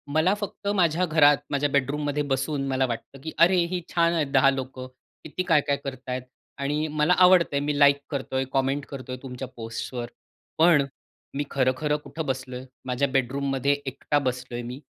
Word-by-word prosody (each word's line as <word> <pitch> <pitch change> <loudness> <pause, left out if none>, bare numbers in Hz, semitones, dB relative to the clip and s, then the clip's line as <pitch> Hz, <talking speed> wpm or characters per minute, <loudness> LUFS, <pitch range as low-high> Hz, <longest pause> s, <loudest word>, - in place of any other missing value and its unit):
मला 165 +5 +4
फक्त 205 0 -6
माझ्या 175 -1 +2
घरात, 150 -3 +5
माझ्या 145 +1 +1
बेडरूममध्ये 145 +1 0
बसून 135 +1 -1
मला 130 0 +1
वाटतं, 120 +3 -6
की 160 +2 -5
अरे, 175 +3 +6
ही 180 0 -3
छान 170 0 +3
आहेत, 160 -4 +1
10 135 -1 +5
लोकं 130 -1 -5 0.4
किती 170 +4 -4
काय-काय 145 -4 +2
करत 130 -2 -7
आहेत. 125 0 -2 0.4
आणि 150 +3 -1
मला 150 +3 +2
आवडत 180 -1 +7
आहे, 140 - +2
मी 145 0 -1
लाइक 140 -1 +6
करतोय, 130 -2 -2
कमेंट 135 +1 0
करतोय 130 -2 -7
तुमच्या 130 0 -6
पोस्ट्सवर. 120 +1 -5 0.5
पण 160 -3 +5 0.5
मी 145 - 0
खरं-खरं 135 +3 +1
कुठं 145 +3 -5
बसलोय? 130 -1 -4 0.2
माझ्या 130 +2 0
बेडरूममध्ये 135 +1 +1
एकटा 140 +2 -1
बसलोय 125 -1 -3
मी. 125 +2 -7
140 Hz, 165 wpm, -25 LUFS, 130-150 Hz, 0.5 s, आवडत